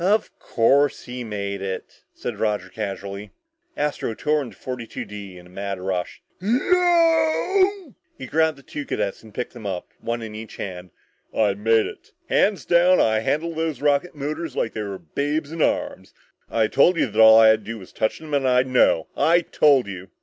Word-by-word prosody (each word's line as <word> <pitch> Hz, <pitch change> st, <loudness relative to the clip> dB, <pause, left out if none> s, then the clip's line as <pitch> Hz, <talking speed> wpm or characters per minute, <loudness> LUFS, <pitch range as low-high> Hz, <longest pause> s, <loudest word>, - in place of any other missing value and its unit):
"Of 205 Hz, +4 st, +2 dB
course 140 Hz, +5 st, +2 dB
he 125 Hz, 0 st, -6 dB
made 100 Hz, -3 st, -4 dB
it," 95 Hz, -1 st, -6 dB
said -, -, -6 dB
Roger 105 Hz, -4 st, -1 dB
casually. 100 Hz, 0 st, -6 dB, 0.5 s
Astro 145 Hz, -6 st, -2 dB
tore 150 Hz, +4 st, +1 dB
into 130 Hz, -, -8 dB
42 125 Hz, -3 st, -6 dB
D 100 Hz, -3 st, -9 dB
with 90 Hz, -, -13 dB
a -, -, -16 dB
mad 100 Hz, +1 st, -5 dB
rush. 90 Hz, -1 st, -4 dB, 0.2 s
"Yeeeoooooowwww!" 340 Hz, -, +2 dB, 0.2 s
He 130 Hz, -, -7 dB
grabbed 160 Hz, +2 st, +1 dB
the 140 Hz, -, -16 dB
two 145 Hz, -, -6 dB
cadets 100 Hz, -, -3 dB
and 110 Hz, -, -15 dB
picked 125 Hz, -, -5 dB
them 115 Hz, -4 st, -8 dB
up, 90 Hz, -2 st, -4 dB
one 115 Hz, 0 st, -3 dB
in 110 Hz, -1 st, -7 dB
each 110 Hz, 0 st, -9 dB
hand. 90 Hz, -2 st, -7 dB, 0.5 s
"I 105 Hz, -3 st, +3 dB
made 110 Hz, +2 st, +2 dB
it -, -, -10 dB, 0.2 s
hands 205 Hz, -1 st, +2 dB
down 175 Hz, +1 st, +4 dB
I 110 Hz, -1 st, +3 dB
handled 160 Hz, +8 st, -1 dB
those 160 Hz, -5 st, -2 dB
rocket 145 Hz, +4 st, +1 dB
motors 150 Hz, +1 st, -4 dB
like 115 Hz, -, -1 dB
they 110 Hz, -, -4 dB
were 100 Hz, -2 st, -5 dB
babes 145 Hz, -, -3 dB
in 165 Hz, -1 st, -4 dB
arms! -, -, -1 dB, 0.3 s
I 115 Hz, -1 st, +2 dB
told 165 Hz, +10 st, +3 dB
you -, -, +3 dB
that 110 Hz, -2 st, +1 dB
all 110 Hz, 0 st, +9 dB
I 110 Hz, -1 st, +8 dB
had 110 Hz, 0 st, +4 dB
to 105 Hz, -, -6 dB
do 115 Hz, -, -5 dB
was 95 Hz, -4 st, -13 dB
touch 110 Hz, -, -1 dB
them 155 Hz, -2 st, -9 dB
and 140 Hz, -2 st, +2 dB
I'd 125 Hz, 0 st, +3 dB
know! 125 Hz, -10 st, +3 dB
I 170 Hz, +2 st, +4 dB
told 145 Hz, -5 st, +3 dB
you!" 95 Hz, -1 st, -8 dB
125 Hz, 195 wpm, -23 LUFS, 105-155 Hz, 0.5 s, all